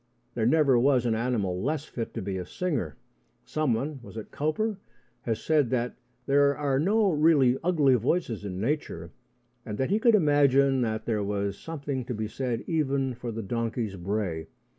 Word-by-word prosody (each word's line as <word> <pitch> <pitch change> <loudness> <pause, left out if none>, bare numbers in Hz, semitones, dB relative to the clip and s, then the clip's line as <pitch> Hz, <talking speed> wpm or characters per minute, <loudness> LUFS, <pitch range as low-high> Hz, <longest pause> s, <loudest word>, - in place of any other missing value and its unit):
There 110 -1 0
never 140 -3 +4
was 130 -1 +3
an 115 - +2
animal 110 -6 -1
less 150 +4 -1
fit 115 -6 -5
to 115 - -3
be 95 0 -3
a 90 - -5
singer. 140 - -2 0.5
Someone 145 -1 -1
was 115 - -11
it 110 - -7
Cowper? 190 +8 -1 0.5
has 115 -1 -2
said 150 -6 +2
that 125 -1 -1 0.3
there 140 0 +3
are 140 -2 +1
no 200 +5 +3
really 150 -5 +4
ugly 155 -6 +3
voices 125 - 0
in 95 -2 -5
nature, 105 - -2 0.5
and 105 -4 -5
that 130 - -1
he 210 - +3
could 230 0 +5
imagine 140 -5 +4
that 110 -2 -2
there 110 -3 0
was 100 0 -2
something 140 -2 -4
to 125 - -4
be 110 0 -3
said 120 0 -3
even 140 -5 0
for 120 0 -6
the 115 0 -5
donkey's 115 0 -2
bray. 90 -4 -3
130 Hz, 175 wpm, -27 LUFS, 110-150 Hz, 0.5 s, could